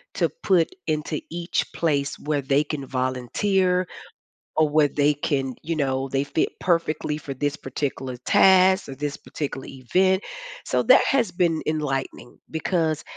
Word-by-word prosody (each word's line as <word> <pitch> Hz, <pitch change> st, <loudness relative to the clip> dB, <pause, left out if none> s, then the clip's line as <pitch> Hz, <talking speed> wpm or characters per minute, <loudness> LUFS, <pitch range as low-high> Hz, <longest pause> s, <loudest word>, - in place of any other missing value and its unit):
to -, -, +1 dB
put 175 Hz, -4 st, +3 dB, 0.2 s
into 155 Hz, 0 st, -2 dB
each 170 Hz, +1 st, -2 dB
place 145 Hz, -4 st, 0 dB
where 150 Hz, -1 st, -1 dB
they 140 Hz, +2 st, +2 dB
can 145 Hz, -2 st, -5 dB
volunteer, 180 Hz, -, 0 dB, 0.7 s
or 155 Hz, -1 st, +4 dB
where 150 Hz, -1 st, +3 dB
they 145 Hz, +1 st, +2 dB
can, 135 Hz, -3 st, -2 dB
you 165 Hz, +2 st, -2 dB
know, 135 Hz, -2 st, -1 dB
they 135 Hz, +1 st, 0 dB
fit 150 Hz, -, 0 dB
perfectly 165 Hz, -3 st, 0 dB
for 145 Hz, -3 st, -6 dB
this 145 Hz, +2 st, -2 dB
particular 135 Hz, -2 st, -4 dB
task 190 Hz, -1 st, +5 dB
or 135 Hz, -, -6 dB
this 145 Hz, 0 st, -3 dB
particular 140 Hz, -3 st, -6 dB
event. 185 Hz, +9 st, +1 dB, 0.4 s
So -, -, +1 dB
that -, -, +7 dB
has 250 Hz, -7 st, +2 dB
been 170 Hz, -3 st, +1 dB
enlightening 135 Hz, -5 st, -3 dB
because 160 Hz, -1 st, 0 dB
150 Hz, 145 wpm, -24 LUFS, 135-170 Hz, 0.7 s, that